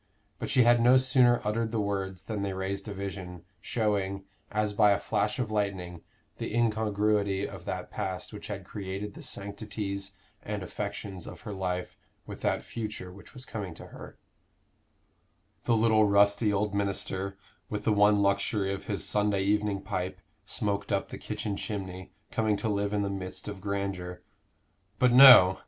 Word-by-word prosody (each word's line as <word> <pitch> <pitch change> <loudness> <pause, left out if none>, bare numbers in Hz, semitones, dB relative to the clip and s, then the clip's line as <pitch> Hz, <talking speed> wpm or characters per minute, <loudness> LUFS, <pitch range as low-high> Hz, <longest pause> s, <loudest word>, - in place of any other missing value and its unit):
But - - -4
she 125 - +5
had 120 0 +5
no 125 +2 +7
sooner 130 -2 +4
uttered 110 +2 0
the 115 -1 -1
words 95 -2 -2
than 110 -3 -4
they 100 -1 -2
raised 95 +2 -3
a - - -4
vision, 95 -3 -6 0.2
showing, 100 -4 -1 0.3
as 105 -1 0
by 105 -1 +5
a 100 - 0
flash 105 +1 0
of 120 -4 -2
lightning, 95 -5 -2 0.4
the - - -3
incongruity 105 -3 +1
of - - -10
that - - -4
past 95 +3 -4
which 105 - -8
had 100 -3 -6
created 100 +1 -5
the - - -10
sanctities 100 -1 -4 0.3
and 105 -2 -4
affections 100 -1 -5
of - - -9
her 105 - -6
life 90 -2 -3 0.3
with - - -9
that - - 0
future 105 -5 -6
which 100 +8 -15
was 130 0 -8
coming 100 -7 -6
to - - -10
her - - -11 1.5
The 115 - +3
little 110 -1 +4
rusty 100 +2 +4
old 105 0 0
minister, 100 -1 -2 0.3
with 105 - -3
the 110 - +3
one 105 0 +5
luxury 100 0 +1
of 100 - -6
his 100 -2 -2
Sunday 105 -2 +1
evening 105 -1 +1
pipe, 90 0 -3 0.3
smoked 100 -1 -1
up - - 0
the - - -7
kitchen 105 -2 -3
chimney, 95 -3 -5 0.2
coming 110 -2 +1
to 110 - -1
live 100 -1 0
in 105 -1 0
the 100 - -1
midst 95 0 -5
of 100 -2 -6
grandeur 95 -3 -3 0.7
but 125 -1 +4
no! 125 -8 +10
100 Hz, 170 wpm, -29 LUFS, 95-105 Hz, 1.5 s, no